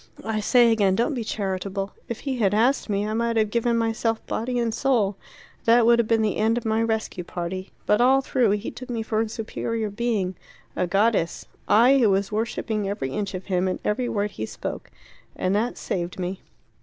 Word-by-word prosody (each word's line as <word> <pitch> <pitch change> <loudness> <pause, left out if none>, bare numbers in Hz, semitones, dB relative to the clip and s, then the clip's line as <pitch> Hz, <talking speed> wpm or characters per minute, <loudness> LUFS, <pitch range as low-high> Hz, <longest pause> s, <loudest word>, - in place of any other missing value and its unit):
"I 220 -1 -1
say 235 +2 +5
again, 200 -4 +3
don't 240 +9 +1
be 240 -4 -3
charitable. 195 -1 -3 0.2
If 235 - -4
he 270 -2 -2
had 205 -2 +2
asked 240 +3 +2
me, 205 0 0
I 215 - -2
might 230 0 0
have 215 -1 +2
given 235 0 +1
myself 225 0 -1
body 245 +2 -2
and 235 -2 0
soul. 230 -7 +1 0.5
That 230 0 +5
would 235 0 +5
have 230 - +2
been 225 -1 +2
the 215 - 0
end 225 +2 +2
of 240 - -4
my 220 0 +1
rescue 220 -5 -2
party. 180 +2 -5 0.2
But 210 +3 +3
all 265 +2 +5
through 255 -4 +1
he 205 - -5
took 255 +1 -10
me 230 -2 -2
for 220 -1 0
a 225 - -2
superior 225 0 -3
being 205 -4 -1 0.4
a 180 - 0
goddess. 195 -2 +1 0.2
I 250 +5 +6
who 230 -4 +4
was 195 +1 +1
worshipping 215 -1 -2
every 135 -10 -3
inch 200 +3 -3
of 185 - -6
him, 185 -1 0
and 185 - -1
every 240 +4 0
word 205 -1 -1
he 110 - -5
spoke. - - -6 0.5
And 185 - 0
that 225 +4 0
saved 175 -1 -3
me." 185 +1 -4
220 Hz, 205 wpm, -24 LUFS, 195-235 Hz, 0.5 s, I